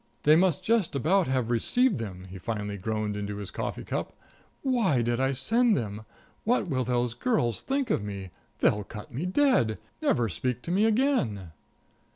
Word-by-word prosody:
"They 150 +1 +7
must 175 -2 +2
just 225 -9 +1
about 170 +7 +2
have 130 -3 0
received 230 - +2
them," 95 -5 -6
he 95 +1 -9
finally 105 0 -3
groaned 105 +1 -2
into 105 0 -4
his 100 -2 -6
coffee - - -4
cup. - - -3 0.5
"Why 220 - +2
did 120 +1 0
I 135 0 +2
send 225 - +2
them! 110 -1 -4 0.4
What 235 -3 +1
will 130 -5 0
those 120 -1 0
girls 120 - 0
think 270 -3 -1
of - - +1
me! 100 -3 -6 0.3
They'll 105 0 +3
cut 105 +3 -10
me 150 +9 -2
dead 180 - +3 0.2
never 120 -1 +2
speak 125 +5 -3
to 170 - -4
me 200 +4 +3
again." 210 - +1
125 Hz, 175 wpm, -28 LUFS, -, 0.5 s, They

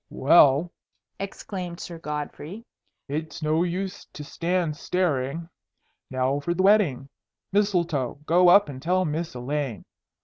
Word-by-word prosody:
"Well," 145 +3 +5 0.5
exclaimed 185 -3 -6
Sir 170 -2 -7
Godfrey, 150 +7 -6 0.4
"it's 155 +2 -5
no 155 +2 +2
use 185 +2 -3
to 150 - -7
stand 170 +1 -1
staring. 165 -2 -1 0.6
Now 130 +2 0
for 170 +4 -2
the 185 - +1
wedding! 190 -11 +3 0.4
Mistletoe, 170 - +1
go 175 +3 +5
up 200 +1 +7
and 135 -3 -8
tell 185 +4 +1
Miss 160 -1 -3
Elaine. 130 -4 -3
165 Hz, 125 wpm, -25 LUFS, 145-180 Hz, 0.6 s, up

